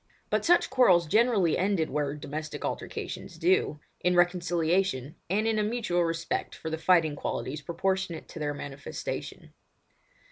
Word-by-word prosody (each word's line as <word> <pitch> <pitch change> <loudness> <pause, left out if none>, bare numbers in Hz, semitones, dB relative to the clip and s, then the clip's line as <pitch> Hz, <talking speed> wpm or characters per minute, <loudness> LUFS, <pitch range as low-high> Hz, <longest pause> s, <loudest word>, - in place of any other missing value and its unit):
But - - +2
such 350 +1 +4
quarrels 185 -9 +5
generally 210 -2 +3
ended 185 -4 +1
where 145 -1 -1
domestic 150 +1 -5
altercations - - -5
do, 355 - +2 0.2
in 180 0 +2
reconciliation, 175 -4 +1 0.2
and 210 +4 +1
in 220 -1 +1
a - - +2
mutual 210 -6 0
respect 165 0 -2
for 160 - -6
the 160 - -2
fighting 160 -4 +3
qualities 145 +1 -3
proportionate 180 +1 -2
to - - -8
their 145 -1 -2
manifestation. 145 -1 -6
170 Hz, 140 wpm, -28 LUFS, 155-195 Hz, 0.2 s, quarrels